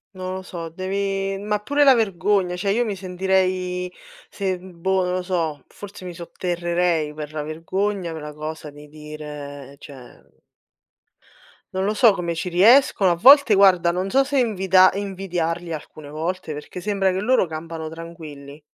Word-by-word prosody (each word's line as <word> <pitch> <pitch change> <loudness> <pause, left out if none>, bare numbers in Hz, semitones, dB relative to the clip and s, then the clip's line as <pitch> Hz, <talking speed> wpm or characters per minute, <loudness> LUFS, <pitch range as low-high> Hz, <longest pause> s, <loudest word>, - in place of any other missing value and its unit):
Non 185 0 -5
lo 190 - -5
so, 170 -3 -7
devi 195 +2 -2
ma 210 +1 -2
pure 285 +7 +1
la 270 -2 +8
vergogna 195 -4 +1
cioè 195 +2 -1
io 240 +3 +1
mi 205 -3 -3
sentirei 185 -1 -1 0.4
se 190 -2 -2
boh 185 +1 -2
non 180 0 -1
lo 185 - -1
so, 165 -6 -2
forse 200 -2 -11
mi 180 - -6
sotterrerei 170 -2 -1
per 150 0 -7
la 150 -1 -3
vergogna 175 +3 -3
per 160 - -7
la 150 0 -7
cosa 155 0 -7
di 145 +1 -14
dire 150 -2 -9
cioè 135 -5 -15 1.3
Non 190 0 -1
lo 210 +2 0
so 220 0 +5
come 170 -3 -3
ci 165 +2 -4
riescono 195 +1 +5
a - - +2
volte 270 - +7
guarda 185 -3 +5
non 185 +2 -2
so 270 +4 +4
se 280 0 0
invida 190 -5 +4
invidiarli 175 -4 -3
alcune 150 -1 -9
volte, 160 +2 -4
perché 150 +4 -8
sembra 195 0 0
che 185 - -2
loro 245 -1 +2
campano 160 0 -6
tranquilli. 155 -3 -10
180 Hz, 165 wpm, -22 LUFS, 160-195 Hz, 1.3 s, la